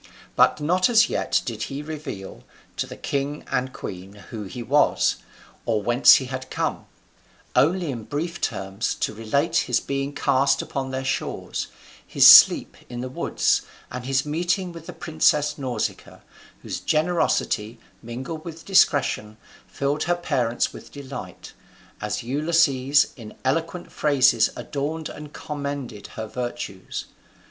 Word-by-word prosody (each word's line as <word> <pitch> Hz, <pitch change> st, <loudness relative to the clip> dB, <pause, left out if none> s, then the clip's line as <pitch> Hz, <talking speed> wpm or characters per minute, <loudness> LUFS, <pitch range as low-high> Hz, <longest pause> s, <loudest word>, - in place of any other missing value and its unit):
But -, -, +4 dB
not 180 Hz, +7 st, +2 dB
as 235 Hz, -1 st, +5 dB
yet -, -, 0 dB
did 110 Hz, -3 st, -3 dB
he 140 Hz, +2 st, -5 dB
reveal 150 Hz, -11 st, -7 dB, 0.3 s
to -, -, -2 dB
the -, -, -9 dB
king 140 Hz, +1 st, -3 dB
and 130 Hz, +1 st, 0 dB
queen 95 Hz, -3 st, -8 dB, 0.2 s
who 110 Hz, -3 st, -5 dB
he 120 Hz, +5 st, -7 dB
was, 145 Hz, +6 st, +2 dB, 0.5 s
or 110 Hz, -3 st, 0 dB
whence 120 Hz, +4 st, +7 dB
he 130 Hz, -, 0 dB
had 130 Hz, 0 st, -6 dB
come; -, -, -3 dB, 0.7 s
only 170 Hz, +1 st, +3 dB
in 115 Hz, -4 st, -6 dB
brief 165 Hz, +4 st, -4 dB
terms 95 Hz, +2 st, -2 dB
he -, -, 0 dB
related 115 Hz, +9 st, 0 dB
his 120 Hz, -1 st, +2 dB
being 140 Hz, 0 st, -3 dB
cast 135 Hz, -1 st, +2 dB
upon 135 Hz, -1 st, -3 dB
their 130 Hz, 0 st, -4 dB
shores, 135 Hz, 0 st, -3 dB, 0.4 s
his -, -, +3 dB
sleep -, -, +9 dB
in 120 Hz, -1 st, -5 dB
the 130 Hz, -, -4 dB
woods, 130 Hz, -, +1 dB, 0.3 s
and 125 Hz, -1 st, -6 dB
his 135 Hz, +1 st, +1 dB
meeting 175 Hz, +4 st, -1 dB
with 165 Hz, -1 st, -11 dB
the -, -, -7 dB
princess 150 Hz, -2 st, +1 dB
Nausicaa, 125 Hz, -5 st, -4 dB, 0.4 s
whose -, -, -4 dB
generosity, 155 Hz, -8 st, 0 dB, 0.2 s
mingled 130 Hz, +7 st, -6 dB
with 165 Hz, -1 st, -9 dB
discretion, 140 Hz, -, +2 dB, 0.3 s
filled 140 Hz, +2 st, -1 dB
her 175 Hz, +1 st, +2 dB
parents 130 Hz, -9 st, -1 dB
with -, -, -12 dB
delight, 140 Hz, -3 st, -9 dB, 0.5 s
as 105 Hz, +1 st, -3 dB
Ulysses 140 Hz, 0 st, +2 dB
in 110 Hz, -4 st, -11 dB
eloquent 165 Hz, +6 st, -1 dB
phrases 140 Hz, -5 st, +3 dB
adorned 150 Hz, +3 st, -4 dB
and 150 Hz, -1 st, -9 dB
commended 140 Hz, -9 st, -6 dB
her 110 Hz, -, -3 dB
virtues. 120 Hz, -5 st, -5 dB
135 Hz, 140 wpm, -24 LUFS, 120-155 Hz, 0.7 s, sleep